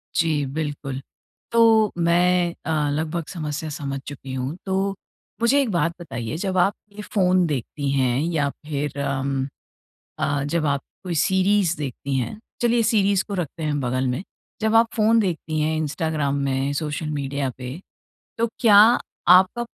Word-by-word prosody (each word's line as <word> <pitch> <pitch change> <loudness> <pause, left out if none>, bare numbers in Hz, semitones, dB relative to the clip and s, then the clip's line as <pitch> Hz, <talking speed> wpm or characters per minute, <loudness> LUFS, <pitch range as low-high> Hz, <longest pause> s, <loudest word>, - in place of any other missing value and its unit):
जी, 155 -4 +2
बिल्कुल। 140 -2 -4 0.5
तो, 225 -2 +5
मैं 175 +1 +3
अ, 150 -2 0
लगभग 160 +2 -2
समस्या 155 -3 -4
समझ 140 -2 -4
चुकी 135 -2 -7
हूँ। 130 +4 -3
तो, 195 +1 0 0.5
मुझे 270 +5 +4
एक 260 - -1
बात 170 -1 +1
बताइए 120 -3 -5
जब 190 0 -2
आप 190 +3 +4 0.2
ये 210 - -6
फ़ोन 185 -3 +2
देखती 140 0 -3
हैं 130 -2 +1
या 145 -3 +1 0.2
फिर 145 -1 -3
उम, 135 0 -1 0.7
अ, 145 -1 0
जब 155 +2 -1
आप 140 -1 +1 0.2
कोई 175 -2 -3
सीरीज 190 +1 +2
देखती 135 -1 -4
हैं, 130 - -3 0.2
चलिए 235 -1 +3
सीरीज 200 -4 +3
को 205 - -7
रखते 170 -3 -4
हैं 145 -1 0
बगल 130 +1 0
में। 125 +9 -2 0.4
जब 220 +1 +2
आप 230 0 +6
फ़ोन 225 +1 +4
देखती 165 -6 -1
हैं, 155 +1 +1
इंस्टाग्राम 150 -2 -1
में, 135 +1 0
सोशल 150 +1 -3
मीडिया 140 -2 -2
पे, 130 +5 -6 0.6
तो 230 - +2
क्या 215 -5 +6 0.5
आपका 185 +6 +6
155 Hz, 155 wpm, -23 LUFS, 140-190 Hz, 0.7 s, आप